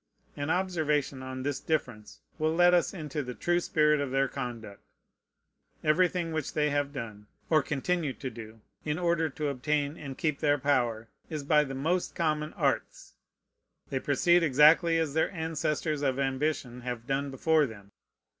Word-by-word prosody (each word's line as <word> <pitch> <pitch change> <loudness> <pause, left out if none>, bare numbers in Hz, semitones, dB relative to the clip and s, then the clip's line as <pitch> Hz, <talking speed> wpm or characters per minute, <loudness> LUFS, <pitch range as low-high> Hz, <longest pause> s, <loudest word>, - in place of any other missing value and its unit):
An 145 +1 -3
observation 155 -7 0
on 130 0 -6
this 145 0 -2
difference 110 -10 -3 0.2
will 155 +1 +1
let 175 +1 +5
us 175 - +3
into 155 -5 -4
the 125 -3 -6
true 175 +10 +1
spirit 150 -3 +2
of 140 - -2
their 135 +1 +1
conduct. 120 -7 -6 1.0
Everything 170 +2 +2
which 155 -3 -3
they 150 -1 +2
have 145 0 0
done, 110 -6 -7 0.2
or 155 -1 +5
continue 150 +2 -1
to 130 -1 -6
do, 110 -1 -11 0.2
in 150 0 -2
order 170 -2 +1
to 150 +1 -3
obtain 145 +3 -1
and 135 -3 -7
keep 155 -3 -1
their 145 -1 +3
power, 120 -5 0 0.2
is 155 -3 -4
by 150 +1 +4
the 135 -2 -6
most 165 +7 -1
common 155 -2 0
arts. - - -2 0.8
They 135 - 0
proceed 175 +6 +3
exactly 160 +3 +5
as 160 -3 0
their 160 - +2
ancestors 160 -3 -2
of 135 -2 0
ambition 135 -2 -1
have 120 -2 -5
done 140 +1 -1
before 150 +3 +2
them. 100 -3 -12
145 Hz, 165 wpm, -29 LUFS, 130-160 Hz, 1.0 s, let